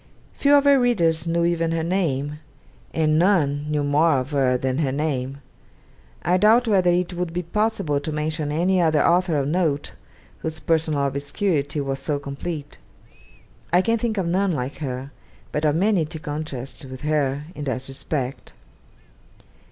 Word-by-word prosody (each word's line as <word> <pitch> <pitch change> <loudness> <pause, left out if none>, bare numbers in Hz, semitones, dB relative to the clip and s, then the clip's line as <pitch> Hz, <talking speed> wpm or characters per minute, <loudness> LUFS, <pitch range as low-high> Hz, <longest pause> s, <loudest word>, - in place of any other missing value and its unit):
Few 280 - +1
of 285 - +5
her 280 -1 +5
readers 170 -10 +2
knew 170 0 +1
even 165 -1 +1
her 165 -1 -1
name, 150 -5 -1 0.5
and 155 -1 +2
none 150 -6 +2
knew 150 -1 0
more 150 +3 +3
of 130 +3 -3
her 130 -3 +2
than 130 +2 -1
her 140 -4 +1
name. 140 -2 -2 0.8
I 180 +2 +3
doubt 225 +5 +5
whether 190 -4 +3
it 175 +1 +1
would 175 -1 -3
be 180 +1 -2
possible 210 -5 0
to 150 +2 -5
mention 150 0 -2
any 180 +4 +2
other 155 -3 +3
author 175 -2 +3
of 140 -1 0
note, 155 -3 0 0.5
whose 160 0 -4
personal 155 -3 +1
obscurity 145 +2 -1
was 135 -1 -3
so 150 -2 -1
complete. 140 +2 -6 0.9
I 180 +2 +4
can 230 +1 +1
think 220 -2 -1
of 190 - 0
none 185 +3 +1
like 130 -2 -3
her, 135 -1 -5 0.4
but 150 +1 -1
of 150 0 +3
many 190 -1 +2
to 160 +1 -7
contrast 145 -2 -6
with 130 -1 -9
her 145 -2 0
in 145 - -6
that 130 -1 -3
respect. 135 0 -4
155 Hz, 165 wpm, -23 LUFS, 140-175 Hz, 0.9 s, of